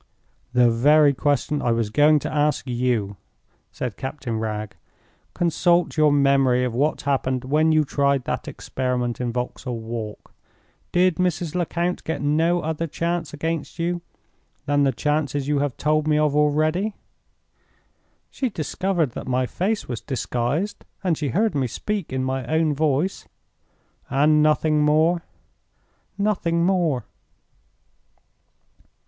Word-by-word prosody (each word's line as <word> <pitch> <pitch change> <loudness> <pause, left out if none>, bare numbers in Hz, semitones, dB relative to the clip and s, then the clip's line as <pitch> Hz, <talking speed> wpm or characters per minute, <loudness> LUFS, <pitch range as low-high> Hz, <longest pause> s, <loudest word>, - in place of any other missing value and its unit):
"The 125 -1 +5
very 145 +5 +5
question 145 +1 0
I 120 - +1
was 115 -2 -1
going 150 +4 +5
to - - -4
ask 150 -1 +1
you," 120 -5 -1 0.5
said 125 -5 -5
Captain 130 -4 -4
Wragge. 110 -1 -3 0.6
"Consult 175 +1 +2
your 155 -2 +4
memory 135 -3 +3
of 125 -2 -1
what 145 +6 0
happened 130 -2 0
when 155 +4 +3
you 155 -1 +4
tried 140 -1 +1
that - - -3
experiment 125 -2 -3
in 120 -1 -1
Vauxhall 125 0 -4
Walk. 110 -1 -7 0.6
Did 180 -1 +3
Mrs. 175 -3 -1
Lecount 175 0 -1
get 160 - -3
no 165 +4 +2
other 160 +1 -2
chance 170 +3 -2
against 160 +1 -4
you 175 +1 -1 0.6
than 145 0 +2
the 135 - +3
chances 145 -1 -1
you 145 -1 +1
have 140 -4 -2
told 155 0 +1
me 150 -1 +3
of 150 -1 +2
already?" 155 +7 +1 1.4
"She 260 - -2
discovered 170 - -1
that - - -7
my 130 0 +1
face 205 - -2
was 120 -3 -4
disguised, 130 - -2 0.2
and 180 -4 +2
she 150 -1 -3
heard 215 +6 +1
me 135 -3 0
speak 200 - -4
in 130 0 -1
my 130 0 -2
own 160 +1 +2
voice." 150 +5 0 0.8
"And 150 +3 +4
nothing 155 0 +3
more?" 160 +3 +3 1.0
"Nothing 175 -5 +1
more." 170 - +1
150 Hz, 135 wpm, -23 LUFS, 130-165 Hz, 1.4 s, The